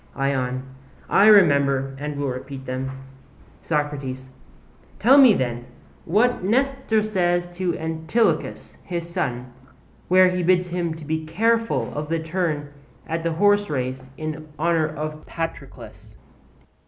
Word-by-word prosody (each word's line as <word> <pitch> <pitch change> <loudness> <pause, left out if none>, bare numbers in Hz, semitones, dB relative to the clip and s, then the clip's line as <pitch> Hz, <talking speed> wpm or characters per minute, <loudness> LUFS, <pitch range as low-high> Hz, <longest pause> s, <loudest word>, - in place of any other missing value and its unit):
ION: 130 -2 -1 0.5
I 205 - +6
remember, 140 -9 +4
and 150 0 -4
will 140 -1 -1
repeat 130 +1 -7
them. 130 +1 -3 0.7
SOCRATES: 140 -4 -3 0.7
Tell 265 +6 +6
me 255 -7 +8
then, 120 -1 -3 0.4
what 220 +6 +2
Nestor 255 0 +1
says 175 -4 0
to 180 -2 -1
Antilochus, 160 +8 -1
his 170 -2 -4
son, 125 -7 -3 0.5
where 185 0 +6
he 180 0 -1
bids 180 0 +2
him 175 -1 -2
be 160 0 -4
careful 225 +8 0
of 150 +1 -4
the 165 - +1
turn 160 -3 -3 0.3
at 165 0 -3
the 165 0 -1
horserace 150 -10 0
in 155 0 -5
honour 165 0 +1
of 155 0 -6
Patroclus. 165 -1 -7
160 Hz, 120 wpm, -23 LUFS, 140-185 Hz, 0.7 s, me